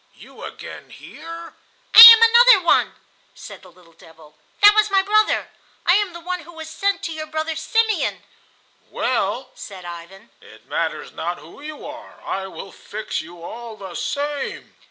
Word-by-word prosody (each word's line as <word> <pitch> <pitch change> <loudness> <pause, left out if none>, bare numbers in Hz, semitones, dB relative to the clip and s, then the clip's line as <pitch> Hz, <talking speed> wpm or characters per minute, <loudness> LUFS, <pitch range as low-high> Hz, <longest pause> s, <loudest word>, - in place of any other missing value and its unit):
You - - -15
again - - -11
here?" 335 0 -12 0.4
"I 445 - +11
am 460 -1 +12
another 465 -4 +5
one!" - - +2 0.4
said - - -12
the 185 - -17
little 170 -1 -23
devil. 160 -2 -20 0.2
"That 415 0 +8
was 425 0 +2
my 390 -1 +2
brother. 430 +2 0 0.3
I 350 - +4
am 410 -4 -2
the 340 - -9
one 360 +1 -5
who 340 +1 -15
was 320 -1 -10
sent 400 +4 -2
to 330 - -4
your 310 0 -7
brother 315 +1 -4
Simeon." 445 +7 -1 0.7
"Well," 250 +2 -3
said 190 -3 -11
Ivan, 175 +5 -12
"it - - -18
matters - - -4
not - - -5
who - - -16
you 300 0 -10
are. 310 +2 -12
I 190 0 -4
will 190 0 -11
fix 215 +1 -7
you 170 +1 -14
all 230 +4 -9
the 190 -3 -10
same." 285 +4 -5
310 Hz, 170 wpm, -20 LUFS, -, 0.7 s, am